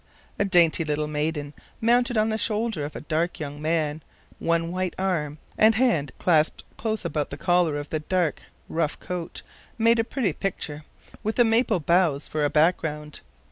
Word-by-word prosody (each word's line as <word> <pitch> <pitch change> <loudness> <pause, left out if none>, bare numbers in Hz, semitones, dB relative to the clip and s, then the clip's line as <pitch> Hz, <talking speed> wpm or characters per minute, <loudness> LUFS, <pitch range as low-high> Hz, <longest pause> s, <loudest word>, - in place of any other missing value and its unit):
The 200 - +1
dainty 175 -3 +5
little 150 -1 -1
maiden, 150 -1 -2 0.3
mounted 240 +1 +3
on 215 +1 +3
the 220 - 0
shoulder 215 -6 0
of 150 - -7
the - - -7
dark 165 +3 -1
young 145 -1 -6
man, 155 -1 0 0.4
one 165 0 0
white 185 0 -2
arm 165 -6 -1 0.2
and 220 +1 +6
hand 205 - +2
clasped 155 -3 +2
close 220 -3 -3
about 155 -3 -1
the - - -7
collar 175 -4 +2
of 145 0 -6
the 155 - 0
dark, 175 0 -1 0.3
rough 160 -2 -1
coat, 180 -2 -6 0.3
made 230 +1 +4
a - - +3
pretty 225 - -1
picture, 150 -5 -4 0.4
with 215 +1 -2
the 240 - +5
maple 225 -3 +2
boughs 165 -3 +2
for 155 -1 -2
a 145 - +2
background. 150 -1 0
170 Hz, 175 wpm, -25 LUFS, 150-210 Hz, 0.4 s, and